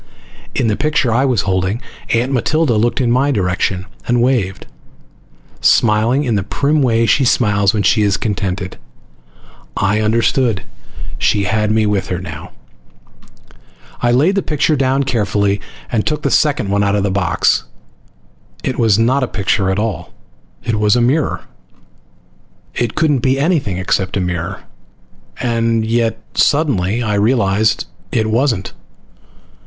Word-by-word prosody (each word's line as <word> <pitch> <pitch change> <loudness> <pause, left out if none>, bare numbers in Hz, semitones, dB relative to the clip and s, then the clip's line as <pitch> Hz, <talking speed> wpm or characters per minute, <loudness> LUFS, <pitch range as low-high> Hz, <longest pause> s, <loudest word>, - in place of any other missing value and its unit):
In - - +1
the 110 -2 +1
picture 145 -4 0
I 130 +4 +2
was 125 -7 +1
holding, 95 +3 -1 0.3
Aunt 120 +3 +1
Matilda 140 +2 +1
looked 115 +4 +1
in 120 -3 +1
my 130 +4 +2
direction 95 -4 -1 0.2
and 120 0 +2
waved, 120 -6 0 0.9
smiling 115 +5 +3
in 120 -5 -1
the 100 - +1
prim 145 +9 0
way 115 -3 +2
she 135 - +3
smiles 105 -5 +2
when 105 -2 -1
she 105 - +3
is 100 -1 +2
contented. 95 -3 -3 1.0
I 105 +2 +1
understood. 115 0 +1 0.6
She 100 - +1
had 105 +2 0
me 110 0 +2
with 100 -2 0
her 90 - -2
now. 85 0 -8 1.5
I 120 - +2
laid 145 +10 +3
the 195 - +1
picture 150 -1 0
down 135 0 +1
carefully, 100 -4 0 0.3
and 110 -4 +1
took 150 -1 -2
the - - 0
second 135 -9 +1
one 100 0 +2
out 100 0 +1
of 100 - 0
the 100 - 0
box. 95 -2 +1 1.0
It 130 - -3
was 110 -4 +3
not 125 +5 +2
a 130 - 0
picture 100 -2 0
at 95 - 0
all, 105 -5 -3 0.5
it 115 -3 -1
was 105 +1 +3
a - - +2
mirror! 140 +6 +1 1.3
It 120 -2 -2
couldn't 150 -4 +2
be 130 +2 +1
anything 140 - 0
except 95 +1 -1
a - - +1
mirror. 90 +1 -3 0.8
And 115 -2 0
yet, 115 0 0 0.2
suddenly, 120 - +1
I 105 -2 -1
realized 105 -1 +1 0.3
it 110 -2 0
wasn't. 115 -5 0
110 Hz, 150 wpm, -16 LUFS, 100-130 Hz, 1.5 s, smiling